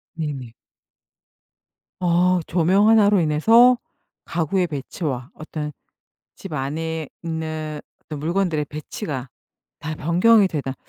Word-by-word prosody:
네네. 140 -7 -5 1.5
어 180 +1 +3
조명 185 +5 +3
1 220 -2 +6
로 205 -3 +4
인해서 225 +11 +5 0.5
가구의 175 +2 0
배치와 140 - -5
어떤 150 -1 -6 0.6
집 190 - -9
안에 155 +2 -3
있는 155 -2 -4 0.2
어떤 150 -2 -7
물건들의 170 -2 0
배치가 150 - -6 0.5
다 155 0 -5
변경이 195 +7 +4
되다 140 -6 -3
160 Hz, 205 characters per minute, -22 LUFS, 150-185 Hz, 1.5 s, 1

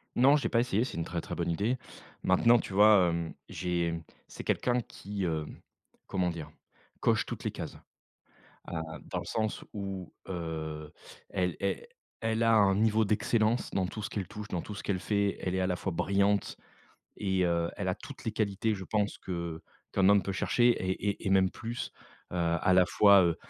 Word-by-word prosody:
Non, 135 +4 +6
j'ai 140 - -1
pas 115 - +3
essayé, 120 -2 +2
c'est 125 - -5
une 80 - -1
très - - -3
très - - -7
bonne - - -1
idée. 105 +9 0 0.5
Maintenant, 120 0 +5
tu 95 - -6
vois, 105 -2 +7
hem, 85 -1 -2 0.2
j'ai 85 -2 -1 0.3
c'est - - -8
quelqu'un 125 0 +1
qui, 100 -3 -6
hem, 80 -3 -3 0.5
comment 90 -2 0
dire? 80 -3 -6 0.5
Coche - - +2
toutes - - -6
les - - -1
cases. - - -6 0.9
Ah, 80 -2 -4 0.3
dans - - -1
le - - -8
sens 110 -1 -2
où, 95 -3 -5 0.2
heu, 80 -3 -4 0.4
elle 90 -3 0
el 100 -1 -1 0.3
elle 115 0 0
a 115 - +5
un 100 -2 +5
niveau 110 +1 +3
d'excellence 110 +2 +1
dans 95 -2 0
tout 110 - -6
ce 100 - -4
qu'elle 100 -3 -3
touche, 105 +2 -8
dans 90 - -2
tout 105 - -7
ce - - -7
qu'elle 95 -3 -1
fait. 100 0 0
Elle 90 0 -2
est 95 - +1
à 95 - +1
la 90 - 0
fois 95 0 -3
brillante 100 +3 +1 0.6
et, 95 -2 +1
heu, 85 -1 +1
elle - - -2
a - - +1
toutes - - -11
les 110 - 0
qualités, 110 0 0
je 95 -1 -6
pense, 105 0 0
que 85 -3 -5 0.3
qu'un 95 +1 +4
homme 100 -2 +5
peut 95 - -3
chercher 120 +5 +3
et 95 -3 -2 0.2
et 100 - -3
et - - +2
même 95 -1 +4
plus. 115 +3 -5 0.4
Heu, - - -3 0.2
à 95 - +3
la 90 -1 +7
fois, 100 +1 +6
heu 85 -2 +2
95 Hz, 200 wpm, -30 LUFS, 90-110 Hz, 0.9 s, vois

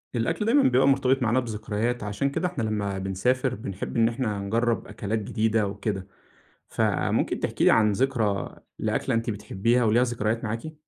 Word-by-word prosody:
الأكل 120 - 0
دايمًا 275 +5 +4
بيبقى 130 +2 +4
مرتبط 135 -1 +3
معانا 120 +1 +2
بذكريات، 115 0 -2
عشان 105 +7 -1
كده 165 +6 -1
إحنا 180 -10 -4
لمّا 105 -3 -2
بنسافر 125 +7 0
بنحب 100 0 -5
إن 115 0 +4
إحنا 115 -4 -2
نجرّب 115 +4 0
أكلات 110 +2 -3
جديدة 110 0 0
وكده. 100 -1 -4 0.6
فممكن - - 0
تحكي - - -1
لي - - +6
عن 105 -1 +4
ذكرى 110 -4 0 0.2
لأكلة - - 0
أنتِ 115 +1 -1
بتحبّيها 105 +3 0
وليها 115 +3 +4
ذكريات 115 -2 -1
معاكِ؟ 115 +8 -4
115 Hz, 160 wpm, -26 LUFS, 105-125 Hz, 0.6 s, لي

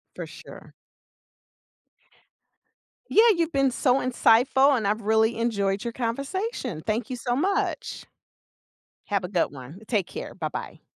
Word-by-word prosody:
For - - -5
sure. - - -13 2.4
Yeah, 460 +2 +6
you've 335 -1 0
been 275 -2 +2
so 255 +1 +2
insightful, 255 +2 +4
and 220 -5 -1
I've 215 +2 0
really 220 +2 +2
enjoyed 200 -4 0
your 235 - -4
conversation. 260 - -3
Thank 220 +2 -1
you 255 - -2
so 245 +1 -2
much. 395 - -1 1.0
Have 200 -2 -1
a - - -3
good 180 -2 0
one. 140 +5 -10
Take 205 -7 0
care. - - -7
Bye-bye. 155 -4 -6
235 Hz, 130 wpm, -25 LUFS, 200-270 Hz, 2.4 s, Yeah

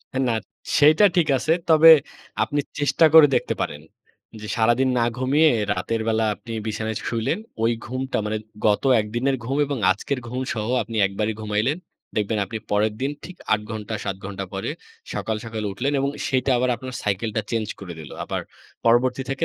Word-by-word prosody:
হ - - -35
না, 115 - +1 0.4
সেইটা 155 +7 +6
ঠিক 165 -4 +3
আছে। 155 - +1 0.2
তবে 160 +1 +9 0.5
আপনি 145 -1 0 0.2
চেষ্টা 145 +3 +3
করে 160 -2 +10
দেখতে - - -1
পারেন। 75 +1 -3 0.6
যে 105 - -7
সারাদিন 120 +4 +3
না 115 - +3
ঘুমিয়ে 145 +5 +4 0.2
রাতের 105 +4 -2
বেলা 110 0 +2
আপনি 115 - -10
বিছানায় 110 0 -3
শুইলেন। 115 - -1 0.2
ওই 115 - +3
ঘুমটা 130 +1 -3
মানে 110 - -1 0.3
গত 105 -1 +3 0.2
১ 105 - -4
দিনের 135 +3 +1
ঘুম 135 +4 -2
এবং 140 -2 -3
আজকের 130 +7 -1
ঘুম 130 +2 -3
সহ 110 -2 -3 0.2
আপনি 115 - -7
একবারই 105 +3 -2
ঘুমাইলেন। 110 +7 0 0.4
দেখবেন 105 0 0
আপনি 110 - -5
পরের 105 +1 +2
দিন 135 +2 0
ঠিক 180 - -10 0.2
৮ 105 - +3
ঘণ্টা 110 0 -5
৭ 100 -1 -3
ঘণ্টা 95 0 -5
পরে 95 - -3 0.4
সকাল, 110 - -2
সকাল 110 -1 -5
উঠলেন 135 +8 -1
এবং 140 +1 0 0.2
সেইটা 130 0 +1
আবার 125 +1 +1
আপনার 130 +3 -8
cycle 105 +2 -1
টা 110 - +1
change 110 -2 -1
করে 95 -3 -7
দিল। 75 - -10
আবার - - -3 0.4
পরবর্তী 125 +3 +3
থেকে 135 - -1
115 Hz, 180 wpm, -23 LUFS, 105-135 Hz, 0.6 s, করে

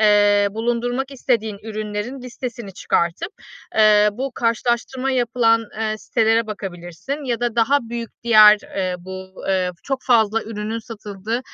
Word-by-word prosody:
eee, 205 -1 +5
bulundurmak 240 +4 -2
istediğin 230 -6 -1
ürünlerin 215 +4 -5
listesini 240 -4 -7
çıkartıp, 170 - -1 0.5
ııı, 210 -1 +6
bu 260 +4 -4
karşılaştırma 240 +3 0
yapılan, 235 -2 +2 0.2
ııı, 215 -1 -1
sitelere 225 0 +1
bakabilirsin 195 - -6
ya 240 -2 -2
da 240 -1 -1
daha 270 +5 +4
büyük 235 -1 -6
diğer, 215 -2 +8 0.2
ııı, 185 -1 0
bu, 190 0 -9
ııı, 185 -1 +1
çok 270 -1 -2
fazla 225 -3 +3
ürünün 220 +1 -4
satıldığı 220 0 -5
225 Hz, 130 wpm, -21 LUFS, 210-240 Hz, 0.5 s, diğer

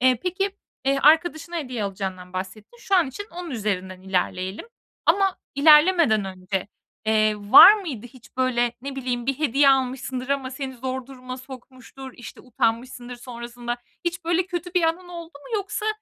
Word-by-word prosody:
Eee, 255 -2 +4
peki, 390 +2 -2 0.3
eee, 275 0 +2
arkadaşına 325 +2 +3
hediye 250 -8 -3
alacağından 190 -2 -5
bahsettin. 190 - -7
Şu 395 - -1
an 350 -5 +4
için 410 +11 -7
onun 350 -1 -7
üzerinden 190 -6 -3
ilerleyelim. 190 - -2 0.4
Ama 385 +2 +3 0.2
ilerlemeden 300 - +5
önce, 190 +1 -4 0.4
eee, 215 -1 +3 0.2
var 405 - +12
mıydı 295 - -6
hiç 250 0 -18
böyle, 245 -2 +1
ne 275 0 -6
bileyim, 245 -2 -3
bir 275 0 -1
hediye 280 -1 +3
almışsındır 260 -1 0
ama 275 -2 -1
seni 265 0 -6
zor 260 +1 -4
duruma 255 -1 -8
sokmuştur, 260 0 -11
işte, 240 - -11
utanmışsındır 245 0 -2
sonrasında? 240 0 -6 0.3
Hiç 345 0 -3
böyle 345 +2 +1
kötü 355 0 -5
bir 355 - +3
anın 340 +2 0
oldu 340 -1 -9
mu 455 +9 -7
yoksa 410 +2 -3
260 Hz, 155 wpm, -24 LUFS, 235-330 Hz, 0.4 s, var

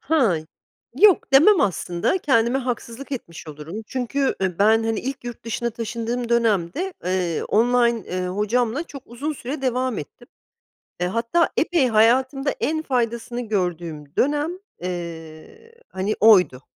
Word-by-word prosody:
Ha, 270 - +2 0.6
yok 400 -9 +5
demem 325 +6 +7
aslında 180 - 0
kendime 245 -4 +2
haksızlık 250 +1 -5
etmiş 170 -10 -7
olurum. 155 +8 -7
Çünkü, 265 +2 -1
ııı, 180 -3 -1
ben 220 +2 +4
hani 225 -1 -1
ilk 265 -1 -5
yurt 240 -2 -8
dışına 235 +1 -2
taşındığım 235 +1 -4
dönemde, 235 - +1
eee, 180 -3 -1
online, 235 +1 +2
eee, 180 0 -3
hocamla 220 - 0
çok 280 -5 -11
uzun 285 +6 -4
süre 270 +1 -6
devam 255 -2 0
ettim. 240 +11 -10 0.7
Eee, 180 - +1
hatta 230 - +1
epey 320 -6 +2
hayatımda 260 +5 +3
en 315 +1 0
faydasını 240 -2 -2
gördüğüm 170 -7 -3
dönem, 295 +3 +1 0.3
eee, 170 - -7
hani, 195 +3 -2
oydu 180 - +5
235 Hz, 130 wpm, -22 LUFS, 190-270 Hz, 0.7 s, demem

